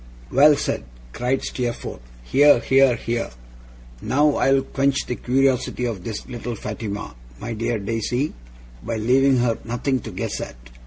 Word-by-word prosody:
'Well 145 +3 +7
said!' - - -2 0.3
cried 125 +2 -1
Steerforth. 120 - -4 0.2
'Hear, 145 - +5
hear, 135 +1 +4
hear! 115 0 -2 0.7
Now 145 +2 +2
I'll 135 0 +3
quench 140 0 0
the - - -2
curiosity 125 0 +1
of 110 -7 -3
this 110 -1 -5
little 120 -1 -5
Fatima, 105 - -5 0.3
my 115 +2 -4
dear 115 +1 -1
Daisy, 115 +7 -2 0.5
by 110 - -3
leaving 130 +4 +3
her 120 -2 +1
nothing 125 +3 -1
to - - -8
guess - - -4
at. - - -6
125 Hz, 145 wpm, -22 LUFS, 115-135 Hz, 0.7 s, Well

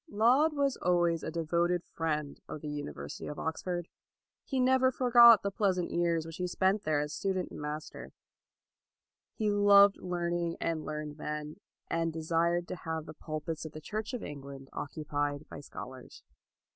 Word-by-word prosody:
Laud 250 +9 +4
was 280 -2 +1
always 175 -2 +2
a - - -4
devoted 170 +2 0
friend 150 -3 -2
of 150 - -6
the 150 - -6
University 145 - -6
of 150 - -6
Oxford. 175 +2 -3 0.6
He 265 - -2
never 260 0 +4
for 250 -1 -2
got 235 -3 +9
the 200 - -1
pleasant 190 -4 0
years 170 -2 +1
which 165 0 -8
he 180 - -1
spent 190 +3 +1
there 155 -2 +2
as 150 0 -3
student 190 0 -2
and - - -8
master. 150 +1 -6 1.2
He 215 -2 +1
loved 200 -1 +6
learning 175 -1 -2
and 165 -2 -1
learned 150 -1 -5
men, 150 +1 -5 0.3
and 165 0 0
desired 170 +2 0
to 185 - -4
have 160 -1 -4
the 155 - -9
pulpits 155 +1 -5
of 155 -1 -8
the 155 - -7
Church 215 - -4
of 240 - -5
England 140 -2 -8
occupied 145 0 -3
by - - -9
scholars. 130 -2 -10
170 Hz, 165 wpm, -31 LUFS, 150-195 Hz, 1.2 s, got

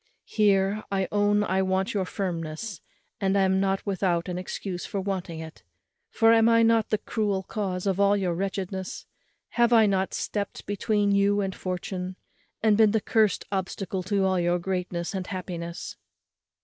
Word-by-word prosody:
Here, 200 -1 +2
I 190 -2 0
own 205 0 +3
I 190 -1 +1
want 190 0 0
your 195 -3 0
firmness, 175 0 -4 0.4
and 195 -1 +1
am 190 -1 +3
not 195 0 0
without 185 -4 0
an 180 0 -3
excuse 180 0 -5
for 200 - -3
wanting 185 -4 -3
it; 160 0 -9 0.5
for 225 0 +4
am 225 0 +5
I 230 0 +5
not 225 -1 +3
the 215 - +2
cruel 205 -3 -1
cause 190 -3 -3
of 195 -1 0
all 200 0 +4
your 185 -3 0
wretchedness? 190 0 -4 0.4
have 240 0 +2
I 225 -2 +6
not 195 -2 0
stept 205 -1 -3
between 205 0 +1
you 200 +1 +3
and 190 -1 -2
fortune, 185 0 -4 0.5
and 215 -2 +5
been 220 -1 +5
the 220 - +3
cursed 215 0 +1
obstacle 190 0 -3
to 195 +1 0
all 190 -1 +2
your 175 0 +2
greatness 180 -1 -3
and 190 -2 -4
happiness?" 175 -2 -6
195 Hz, 165 wpm, -26 LUFS, 185-205 Hz, 0.5 s, I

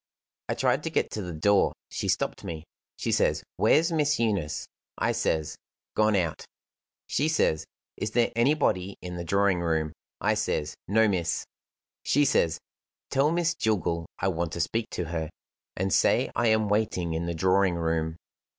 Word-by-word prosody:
I - - 0
tried - - +2
to - - 0
get - - 0
to 105 - -3
the 90 -2 -5
door. 100 +5 +3 0.2
She - - -3
stopped - - -1
me. 80 -2 -5 0.3
She - - -2
says: - - +2
'Where's 165 +3 +4
Miss 150 -2 +2
Eunice?' 100 -10 -1 0.3
I - - +1
says: 80 -1 -1 0.4
'Gone 110 -1 +3
out.' 85 -5 -1 0.6
She 145 - 0
says: 80 - +1 0.3
'Is 105 - -2
there 115 +2 +2
anybody 115 -7 +1
in 90 -1 -5
the 85 - -4
drawing 100 +1 +2
room?' 80 -2 0 0.3
I - - +2
says: 75 +1 -1
'No, 110 +3 +4
miss.' 85 -4 0 0.6
She 145 +1 +3
says: 85 - +2 0.5
'Tell 140 +3 +3
Miss 170 0 +1
Jillgall 90 - -1
I 95 - 0
want 85 -2 -2
to - - -4
speak 110 +7 -1
to 90 - -3
her, 80 -1 -3 0.5
and 95 0 0
say - - +3
I 120 - +2
am 110 -1 +3
waiting 100 -5 0
in 85 +1 -2
the 85 - -2
drawing 95 +2 +3
room. 80 -1 -1
95 Hz, 170 wpm, -27 LUFS, 85-110 Hz, 0.6 s, Where's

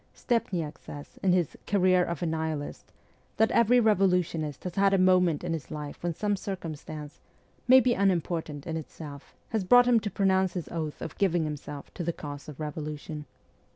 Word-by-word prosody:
Stepniak 175 -10 -1
says, 145 0 -10
in 190 - +3
his 180 -4 +1
' - - -35
Career 185 -2 +4
of 170 -2 -3
a - - +1
Nihilist,' 160 -2 -3 0.5
that 220 - +3
every 235 +2 +5
revolutionist 180 - +1
has 180 - -4
had 195 +1 +3
a - - +3
moment 180 -4 +4
in 175 -1 -1
his 150 -6 -5
life 150 -1 -6
when 175 - -1
some 205 +2 0
circumstance, 155 -6 -6 0.5
maybe 255 -1 +7
unimportant 170 -7 0
in 160 -1 -3
itself, 150 -2 -9
has 220 -4 0
brought 245 +6 +7
him 245 -2 +5
to 210 - -3
pronounce 190 -1 +2
his 175 -7 -4
oath 155 -3 -4
of 160 - -6
giving 175 -4 +2
himself 150 -1 -6
to 175 - -4
the 170 - 0
cause 145 -1 -8
of 150 - -10
revolution. 150 0 -5
170 Hz, 180 wpm, -28 LUFS, 150-195 Hz, 0.5 s, maybe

